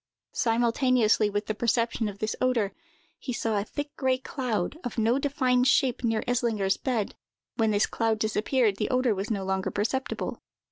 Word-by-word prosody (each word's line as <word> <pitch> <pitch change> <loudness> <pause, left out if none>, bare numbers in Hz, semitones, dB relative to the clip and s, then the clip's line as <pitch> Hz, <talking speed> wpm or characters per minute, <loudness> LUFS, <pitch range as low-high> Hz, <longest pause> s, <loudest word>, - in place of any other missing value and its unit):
Simultaneously 235 -2 +2
with 205 +1 -2
the 215 - -2
perception 230 0 0
of 200 - -9
this 215 +1 -2
odor, 240 -6 +1 0.5
he 255 - -5
saw 225 -3 0
a - - -1
thick, 290 +7 -6
gray 260 -1 +2
cloud, 255 - -3
of 245 - -5
no 230 +4 +2
defined 255 -3 +2
shape, 260 -2 +2
near 225 -2 +1
Eslinger's 230 -6 +1
bed. 235 -6 -1 0.4
When 225 -2 +3
this 205 -1 +3
cloud 225 -1 0
disappeared, 215 0 +1
the - - -1
odor 255 -2 +2
was 195 +1 -4
no 200 -4 -1
longer 190 0 -1
perceptible. 260 +6 -2
230 Hz, 170 wpm, -27 LUFS, 210-255 Hz, 0.5 s, When